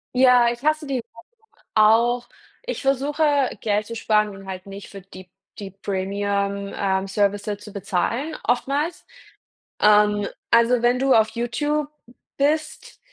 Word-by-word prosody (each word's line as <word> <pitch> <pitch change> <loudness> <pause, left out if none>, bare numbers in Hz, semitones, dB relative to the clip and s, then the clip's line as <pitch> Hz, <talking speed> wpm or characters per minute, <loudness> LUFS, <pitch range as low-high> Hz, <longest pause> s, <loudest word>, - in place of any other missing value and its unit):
Ja, 250 -2 +5
ich 240 +3 -8
hasse 310 0 +1
die 275 -2 -2
Werbung 230 -1 -10 0.5
auch. 235 +3 +3 0.3
Ich - - -5
versuche, 275 +3 0 0.4
Geld 210 -1 0
zu 230 - -6
sparen 215 -1 +1
und 195 -1 -11
halt 185 -1 -7
nicht 195 0 -9
für 195 - -10
die 185 -1 -13 0.3
die 195 -2 -7
premium, 200 +1 -2
ähm, 190 -1 -1
Services 205 +1 -1
zu 210 - -10
bezahlen 220 - -2
oftmals. 280 +7 -1 0.7
Ähm, 210 -1 +4 0.2
also, 235 +1 +4
wenn 245 +1 +3
du 270 0 +3
auf 220 -1 +4
YouTube 290 +6 -1 0.5
bist, 305 +2 -1
225 Hz, 135 wpm, -22 LUFS, 200-260 Hz, 0.7 s, Ja